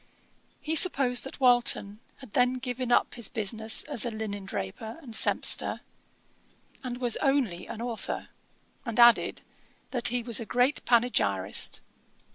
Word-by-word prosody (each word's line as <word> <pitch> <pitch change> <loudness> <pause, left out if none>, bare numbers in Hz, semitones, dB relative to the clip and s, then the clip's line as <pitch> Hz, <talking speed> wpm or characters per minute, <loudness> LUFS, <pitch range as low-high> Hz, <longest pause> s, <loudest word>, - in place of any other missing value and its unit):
He 315 +1 -3
supposed 270 -8 +4
that 270 - -9
Walton 245 -5 +3 0.2
had 260 -7 -15
then 250 0 +3
given 250 -1 -4
up - - +2
his 235 -4 -2
business 220 +1 -2
as 285 -7 -3
a 240 - -2
linen 215 -3 -6
draper 195 - -6
and 260 -8 -12
sempster, - - +1 1.0
and 245 -1 -5
was 245 -2 0
only 260 - 0
an 225 - -7
authour; 235 -2 -5 0.5
and 230 -2 -4
added, 235 0 +5 0.5
'that 245 -2 +2
he 245 0 0
was 235 -2 0
a 230 - -6
great 250 +4 +1
panegyrist.' 225 - +1
240 Hz, 140 wpm, -27 LUFS, 220-250 Hz, 1.0 s, added